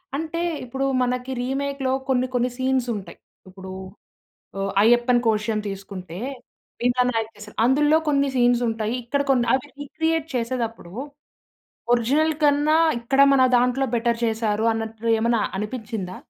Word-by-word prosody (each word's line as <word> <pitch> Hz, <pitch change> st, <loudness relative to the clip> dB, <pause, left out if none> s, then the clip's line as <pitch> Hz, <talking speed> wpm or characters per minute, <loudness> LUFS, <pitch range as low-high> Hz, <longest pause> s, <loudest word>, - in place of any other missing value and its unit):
అంటే 320 Hz, +3 st, -3 dB, 0.3 s
ఇప్పుడు 265 Hz, +2 st, -3 dB, 0.2 s
మనకి 250 Hz, +1 st, -1 dB
రీమేక్‌లో 270 Hz, +1 st, -2 dB, 0.2 s
కొన్ని 255 Hz, -1 st, +2 dB
కొన్ని 245 Hz, +1 st, +1 dB
సీన్సుంటాయి, 250 Hz, -6 st, -2 dB, 0.3 s
ఇప్పుడు 190 Hz, 0 st, -10 dB, 0.9 s
ఆహ్, 195 Hz, 0 st, -1 dB
'అయ్యప్పన్ 240 Hz, +2 st, +4 dB
కోషియుమ్' 215 Hz, -1 st, +1 dB
తీసుకుంటే 190 Hz, -3 st, -7 dB, 0.6 s
'భీమ్లా 245 Hz, +1 st, +2 dB
నాయక్ 225 Hz, -2 st, -2 dB
చేసారు.' 210 Hz, 0 st, -12 dB
అందులో 295 Hz, +5 st, +4 dB
కొన్ని 280 Hz, -1 st, +2 dB
సీన్సుంటాయి 240 Hz, -2 st, +1 dB
ఇక్కడ 280 Hz, +4 st, -1 dB
కొన్ని 245 Hz, -3 st, +3 dB
అవి 260 Hz, +1 st, -1 dB
రీక్రియేట్ 320 Hz, +2 st, -1 dB
చేసేటప్పుడు 230 Hz, -6 st, -3 dB, 1.0 s
ఒరిజినల్ 285 Hz, +7 st, +2 dB
కన్నా 295 Hz, +1 st, +4 dB, 0.2 s
ఇక్కడ 270 Hz, +4 st, +1 dB
మన 270 Hz, -1 st, +5 dB
దాంట్లో 250 Hz, +2 st, +2 dB
బెటర్ 235 Hz, 0 st, +1 dB
చేసారు 220 Hz, -1 st, 0 dB
అన్నట్లు 225 Hz, 0 st, -4 dB
ఏమైనా 230 Hz, 0 st, +1 dB, 0.2 s
అనిపిచిందా? 210 Hz, -3 st, -5 dB
240 Hz, 120 wpm, -23 LUFS, 220-270 Hz, 1.0 s, మన